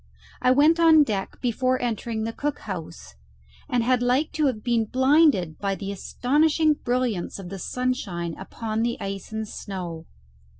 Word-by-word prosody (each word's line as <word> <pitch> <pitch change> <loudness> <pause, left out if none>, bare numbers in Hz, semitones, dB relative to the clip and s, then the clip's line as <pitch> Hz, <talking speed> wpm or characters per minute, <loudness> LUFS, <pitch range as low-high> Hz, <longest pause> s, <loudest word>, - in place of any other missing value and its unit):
I - - +3
went 300 +6 +5
on 320 -2 +7
deck 205 -7 -4
before 255 +1 +1
entering 230 -1 -2
the 225 +1 -3
cook 290 +3 -3
house, 155 - -7 0.6
and 245 -2 +1
had 250 +1 +2
like 255 +5 +1
to 305 -2 +1
have 220 -5 -2
been 235 -2 +1
blinded 260 - +3
by 195 -1 -1
the 195 0 -5
astonishing 300 - +2
brilliance 245 -9 -2
of 190 -3 -8
the 195 0 -7
sunshine 190 -10 -2
upon 220 +3 -4
the 235 +1 0
ice 195 +1 -6
and 220 0 -3
snow. 175 -6 -6
235 Hz, 160 wpm, -25 LUFS, 195-260 Hz, 0.6 s, on